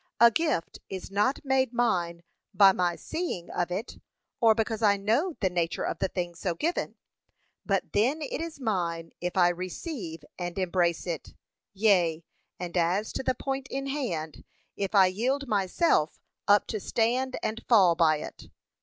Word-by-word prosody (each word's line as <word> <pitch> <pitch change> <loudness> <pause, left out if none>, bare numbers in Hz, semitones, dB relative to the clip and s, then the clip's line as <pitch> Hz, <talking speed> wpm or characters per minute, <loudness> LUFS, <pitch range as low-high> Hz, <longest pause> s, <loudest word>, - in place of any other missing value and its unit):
A 235 +1 +8
gift 305 - -1
is 190 0 -6
not 210 +9 +1
made 265 -2 +2
mine 175 -8 0 0.3
by 195 -2 +8
my 175 -2 0
seeing 320 - -4
of 175 - -1
it, 195 +7 -5 0.4
or 225 -2 +5
because 225 0 -1
I 205 -2 +4
know 240 - +1
the 190 - +2
nature 170 -2 -1
of - - -3
the - - +1
thing 175 -2 -3
so 170 0 -3
given; 335 - -2 0.7
but - - 0
then 250 +9 +2
it 290 - -4
is 330 -3 -6
mine 170 -8 -2
if 180 +1 -3
I 175 -1 +6
receive 180 - -5
and 175 0 -4
embrace 175 -2 +1
it, 170 -4 -5 0.4
yea, 180 -6 +2 0.4
and 175 0 -5
as 180 +5 +1
to - - -2
the 260 -1 0
point 270 +1 -3
in 270 0 -3
hand, 185 - -3 0.3
if 200 +1 -3
I 195 -1 +8
yield 255 +9 -1
myself 195 - +1 0.3
up 205 0 +5
to 215 - -2
stand 250 +5 0
and 220 +2 -3
fall 195 -8 +6
by 165 -2 +4
it. - - -9
200 Hz, 165 wpm, -28 LUFS, 175-250 Hz, 0.7 s, A